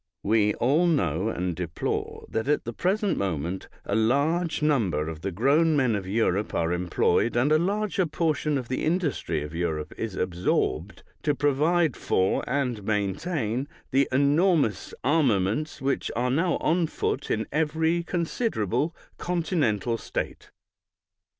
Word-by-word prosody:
We 105 0 +2
all 150 +8 +3
know 110 - +1
and 90 -4 -2
deplore 85 -1 -3
that 110 +3 -2
at 150 - +2
the 120 - -5
present 195 - 0
moment 90 -1 -3 0.2
a - - -3
larger 150 +9 +1
number 95 - +1
of 80 -1 -6
the 95 - -2
grown 145 - +3
men 130 -6 +2
of 95 -2 -4
Europe 105 -1 0
are 85 +1 +1
employed, 90 +6 +1
and 125 +5 +2
a 155 - +5
larger 195 0 0
portion 155 -2 0
of 125 -3 -4
the 130 - -2
industry 155 - 0
of 75 +1 -8
Europe 80 -3 -2
is 110 -4 -3
absorbed, 90 -1 -1 0.2
to 150 -2 +1
provide 150 +2 +2
for, 95 +1 +1
and 125 -5 -1
maintain, 110 - -1 0.2
the 135 +1 +3
enormous 140 - +2
armaments 130 - +1
which 135 0 0
are 125 +2 0
now 165 +5 +1
on 165 +1 +1
foot - - -2
in 110 - 0
every 160 +3 +1
considerable 170 - -1 0.2
continental 150 - 0
state. - - -5
130 Hz, 140 wpm, -26 LUFS, 100-160 Hz, 0.2 s, a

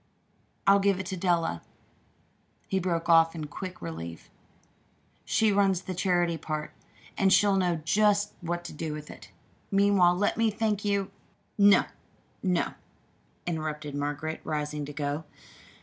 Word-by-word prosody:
"I'll 200 0 +6
give 195 -1 +2
it 190 - -4
to 190 - -4
Della," 170 - 0 1.1
he 190 - 0
broke 170 -2 -1
off 165 -1 +5
in 155 -2 -4
quick 180 - -8
relief. 85 0 -7 0.9
"She 220 -1 +2
runs 195 -2 +2
the 185 - -4
charity 175 -2 +1
part, 155 0 -4 0.5
and 195 -1 +4
she'll 200 0 +5
know 180 -3 +2
just 205 +3 +2
what 175 0 -3
to - - -8
do 155 0 -4
with 150 0 -8
it. - - -13 0.4
Meanwhile, 195 -3 +4
let 205 +3 0
me 230 -1 +3
thank 210 -1 -1
you 200 -2 0 0.2
" - - -42
"No, - - +6 0.6
no," 180 -3 0 0.7
interrupted 155 -3 -3
Margaret, 145 +2 -3
rising 150 -1 -3
to 145 - -8
go. 145 +1 -3
175 Hz, 145 wpm, -28 LUFS, 155-195 Hz, 1.1 s, I'll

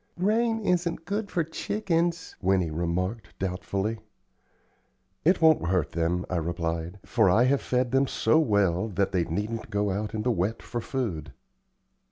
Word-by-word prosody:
"Rain 225 +5 +2
isn't 175 -4 0
good 205 +3 -2
for 170 - 0
chickens," 170 0 -1
Winnie 90 -3 +2
remarked, 90 +7 -3
doubtfully. 95 +3 -2 1.2
"It 175 +2 +3
won't 160 - +5
hurt 90 -3 +1
them," 85 +2 0
I 90 - -1
replied, 85 +1 -2
"for 110 -5 +3
I 110 +7 +5
have 135 +2 +2
fed 125 -1 0
them 135 +1 +3
so 155 - +3
well 100 - +2
that 100 -1 0
they 90 -3 +1
needn't 105 +6 -3
go 105 0 0
out 105 +3 -3
in 105 - -2
the 125 - +2
wet 110 +2 -1
for 120 - -4
food." 90 - -3
105 Hz, 155 wpm, -27 LUFS, -, 1.2 s, won't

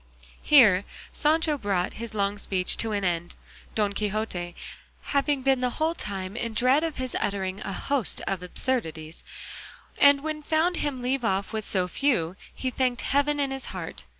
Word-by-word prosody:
Here 215 -10 +6 0.3
Sancho 305 -1 +2
brought 195 -5 0
his 230 -2 -6
long 200 0 0
speech 185 -2 0
to 225 - -1
an 205 -1 -1
end, 175 -1 -1 0.4
Don 205 -2 +1
Quixote 200 -4 -2 0.5
having 280 -1 0
been 265 -1 +3
the 250 - +2
whole 315 +1 +1
time 195 - -4
in 230 -2 -3
dread 255 +6 +4
of 325 -2 -2
his 255 -1 -4
uttering 195 -1 -2
a - - -4
host 275 +4 -1
of 195 -2 -2
absurdities; 165 -6 -3 0.8
and 285 0 +6
when 310 0 -2
he - - -12
found 325 +4 +1
him 265 -4 -2
leave 260 +1 0
off 200 -1 0
with 220 -1 -2
so 185 -2 +1
few, 180 - 0 0.2
he 255 - -3
thanked 255 -1 0
heaven 285 +1 +1
in 275 -1 0
his 270 0 -5
heart. - - -6
235 Hz, 175 wpm, -26 LUFS, 195-280 Hz, 0.8 s, Here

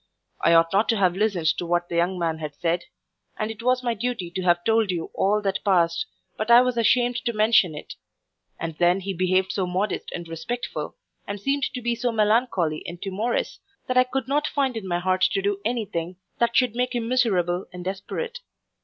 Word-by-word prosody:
I 170 - +5
ought 165 +1 +4
not 205 +3 +2
to 225 - +3
have 185 -3 +3
listened 200 -5 0
to 175 - -3
what 175 0 +1
the 170 - -5
young 180 +2 +1
man 165 -2 -2 0.2
said; 170 +1 0 0.5
and 215 +1 -2
it 225 - -9
was 250 +1 +1
my 240 -1 +1
duty 225 -6 -3
to 185 - -3
have 175 -1 +2
told 225 -1 +2
you 170 -3 -3
all 210 +2 +1
that 195 -1 -1
passed, 170 -4 +2 0.3
but 215 +2 -3
I 235 0 +9
was 250 -1 0
ashamed 240 +1 +3
to 235 0 -2
mention 215 -6 +3
it; 150 - -8 0.7
and 165 -1 -4
then 175 +2 +3
he 195 +1 -3
behaved 185 +1 +1
so 190 -2 -1
modest 190 +4 -2
and 175 -1 -6
respectful, 165 +10 -5 0.3
and 200 0 -4
seemed 275 +6 0
to 250 - -4
be 240 0 +1
so 240 +1 -1
melancholy 210 -7 +1
and 175 - -7
timorous, 210 +6 -2 0.3
that 255 - -2
I 255 - +7
could 255 0 -3
not 295 +2 +1
find 270 -4 0
in 215 -4 -5
my 175 -1 0
heart 185 +1 0
to - - +1
do 200 0 -1
any 230 0 -1
thing 175 -2 -4 0.2
that 235 0 +1
should 250 -3 +2
make 250 0 -1
him 230 -1 -1
miserable 190 -8 +1
and 180 -1 -8
desperate. 450 - -4
200 Hz, 210 wpm, -24 LUFS, 175-235 Hz, 0.7 s, I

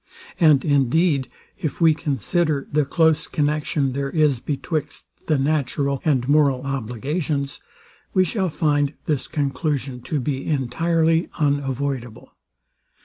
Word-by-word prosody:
And 150 -5 +5
indeed, 140 0 +2 0.3
if 155 -8 -3
we 165 -2 +5
consider 150 - -1
the 150 0 +2
close 160 +1 +2
connexion 150 -2 0
there 140 +1 -2
is 150 -4 +2
betwixt 150 +3 -3 0.2
the 155 - +3
natural 140 -1 0
and 130 -5 +1
moral 140 -3 +3
obligations, 140 +3 -3 0.5
we 185 - +4
shall 185 +1 -1
find 145 -2 0
this 150 -4 -1
conclusion 140 -3 -2
to 150 +4 -2
be 135 0 -3
entirely 165 +4 +1
unavoidable. 140 -5 -2
145 Hz, 115 wpm, -22 LUFS, 135-155 Hz, 0.5 s, And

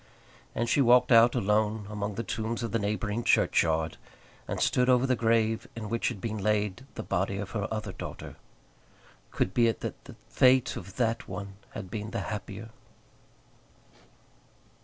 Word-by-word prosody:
And 120 - 0
she 140 - +3
walked 125 0 +5
out 115 +1 +7
alone 105 -1 +1
among 105 -1 -4
the 115 - -3
tombs 115 +2 -3
of 115 - -3
the 115 - +1
neighbouring 105 +2 -2
churchyard, 80 -5 +2 0.5
and - - -3
stood 125 0 +2
over 125 0 +4
the 130 -1 +2
grave 115 -1 +1
in 110 -2 -6
which 115 +1 0
had 120 -5 -3
been 110 0 -3
laid 105 +4 0
the 110 - -4
body 95 +1 -1
of 100 -1 -5
her 105 -2 -2
other 110 -3 -3
daughter. - - -8 0.9
Could 95 - -1
be 120 -1 +4
it 115 - -1
that - - -6
the - - -11
fate 130 0 +4
of 95 +1 -8
that 115 -2 0
one 100 -1 -6 0.2
had 95 -4 -7
been 105 0 -4
the 115 +1 -3
happier. 105 +1 -6
110 Hz, 165 wpm, -28 LUFS, 105-115 Hz, 0.9 s, out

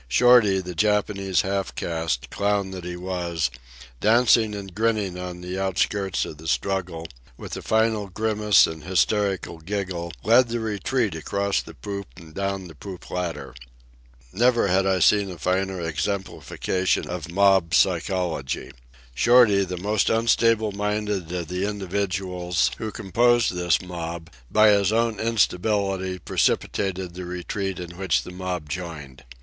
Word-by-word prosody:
Shorty, 105 - +5
the 90 -1 -7
Japanese 100 -1 +1
half 95 0 -2
caste, 80 -6 -2
clown 100 -1 0
that 95 -2 -7
he 90 0 -5
was, 90 -6 -2 0.5
dancing 110 -1 +4
and 100 -2 -8
grinning 110 -3 0
on 90 -1 -6
the 90 +1 -5
outskirts 95 0 0
of 75 - -9
the 80 - -9
struggle, 85 -1 -2 0.3
with - - -7
a - - -6
final 110 -2 +1
grimace 105 0 +3
and 80 -1 -7
hysterical 95 -1 0
giggle 90 -1 -4
led 120 +3 +5
the 120 +1 -2
retreat 110 0 -1
across 100 +5 -1
the 80 - -12
poop 100 +9 -6
and 80 -2 -13
down 100 0 -3
the 80 - -12
poop 90 +4 -10
ladder. 80 -7 -4 0.8
Never 120 -1 +3
had 95 +1 +2
I 95 -1 +2
seen 100 +2 +4
a 90 - -7
finer 95 +2 -1
exemplification 95 +1 -2
of 85 -2 -5
mob 95 -3 +3
psychology. 90 -6 0 0.4
Shorty, 110 - +5
the 90 -1 -5
most 105 +3 +1
unstable 115 -1 +2
minded 105 -3 -2
of 90 -2 -3
the 90 +3 -2
individuals 95 -3 -1
who 110 -1 -4
composed 120 +3 +2
this 90 -1 +1
mob, 85 -2 -6 0.2
by 110 0 +5
his 100 -1 +3
own 115 -1 +1
instability 100 -3 0
precipitated 95 -1 -1
the 90 +1 -7
retreat 90 +2 -4
in 85 -1 -8
which 95 - +1
the - - -9
mob 90 -3 -4
joined. 75 -6 -7
95 Hz, 145 wpm, -24 LUFS, 90-105 Hz, 0.8 s, Shorty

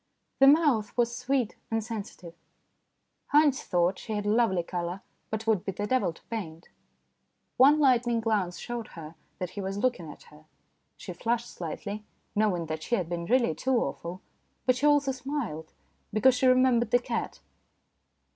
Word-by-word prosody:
The 270 - +7
mouth 275 -9 +4
was 235 0 +1
sweet 250 -3 -1
and 225 -1 -1
sensitive. 205 -6 -7 1.0
Haynes 295 -2 +5
thought 180 +1 +1
she 220 - -6
had 205 -1 -2
lovely 210 -4 +2
colour, 175 +2 -4 0.3
but 220 0 -4
would 220 -5 +2
be 195 - -3
the 205 - -3
devil 255 -5 +1
to 165 - -19
paint. 175 -8 -7 0.9
One 285 +4 +6
lightning 245 -4 +3
glance 210 -6 0
showed 240 -2 -5
her 155 -1 -8 0.2
that 180 -1 -4
he 205 - -6
was 195 +1 -4
looking 205 -8 -1
at - - -15
her; 150 +1 -17 0.5
she 180 - -7
flushed 235 +6 -2
slightly, 200 +5 -6 0.3
knowing 205 -6 +1
that 155 0 -4
she 235 - 0
had 180 -7 -3
been 170 -1 -3
really 240 -8 +3
too 260 +8 0
awful, 170 +1 -3 0.4
but 255 0 +4
she 275 +4 +2
also 290 -2 +3
smiled, 255 - -5 0.4
because 220 +5 +4
she 255 +1 +2
remembered 255 -2 +4
the 245 - +5
cat. 240 -1 -4
220 Hz, 165 wpm, -28 LUFS, 180-255 Hz, 1.0 s, The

